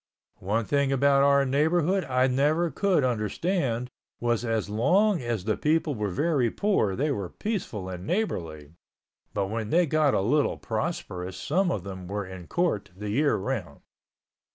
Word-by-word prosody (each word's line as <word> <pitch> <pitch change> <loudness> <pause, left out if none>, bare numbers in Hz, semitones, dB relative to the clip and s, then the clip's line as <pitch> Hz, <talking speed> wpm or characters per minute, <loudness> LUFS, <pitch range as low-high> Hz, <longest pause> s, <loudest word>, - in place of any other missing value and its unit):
One 105 +4 -1
thing 140 +1 +1
about 140 +1 +4
our 140 0 +4
neighborhood 160 +7 +2
I 130 -1 +2
never 150 +6 +2
could 185 0 +2
understand 125 - -1 0.3
was 120 -1 0
as 115 -3 -1
long 180 - +2
as 120 -5 -2
the 110 +1 0
people 155 0 +1
were 105 -4 -2
very 140 - +1
poor 150 - +1
they 145 +6 0
were 100 -9 -3
peaceable 180 - -4
and 90 +1 -7
neighborly 80 - -3 0.6
but 100 -1 -1
when 110 -1 -3
they 175 +6 +4
got 155 -2 +2
a - - +2
little 140 +9 +1
prosperous 100 - -4
some 180 - +1
of 100 - -2
them 95 -2 -7
were 100 +1 -3
in 95 -2 -9
court 170 - 0
the 105 +1 -5
year 145 +6 +2
around. 95 - -4
125 Hz, 160 wpm, -27 LUFS, 105-155 Hz, 0.6 s, about